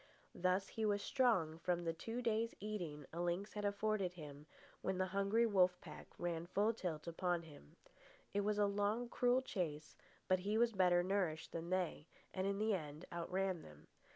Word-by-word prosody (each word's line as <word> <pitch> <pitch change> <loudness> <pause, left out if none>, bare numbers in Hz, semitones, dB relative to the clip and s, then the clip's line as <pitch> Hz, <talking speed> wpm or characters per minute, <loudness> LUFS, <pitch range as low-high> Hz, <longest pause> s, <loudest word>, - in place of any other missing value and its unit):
Thus, 185 +2 +1
he 225 - -3
was 205 -1 +2
strong 185 - +2
from 175 0 0
the 165 -1 0
two 225 +9 -4
days' 230 0 +1
eating 175 -9 -4
a 170 - -2
lynx 175 +4 -1
had 210 - -3
afforded 200 -2 0
him 150 -3 -9 0.3
when 190 -1 -1
the 185 - +2
hungry 200 +4 +3
wolf 185 -4 +4
pack 155 -3 -10
ran 170 -1 -2
full 205 +5 +2
tilt 170 -8 -3
upon 175 0 0
him. 145 - -14 0.6
It 205 - +2
was 210 +1 +1
a 205 - +5
long, 205 +4 0
cruel 250 +1 +3
chase, 155 - -3 0.3
but 185 0 +4
he 205 +4 0
was 235 0 +4
better 180 -3 +4
nourished 180 -4 0
than 165 0 -4
they, 180 -4 -1 0.3
and 190 0 0
in 200 0 0
the 215 +1 +2
end 155 -4 -4
outran 180 +1 -1
them. 75 0 -14
185 Hz, 180 wpm, -39 LUFS, 170-210 Hz, 0.6 s, a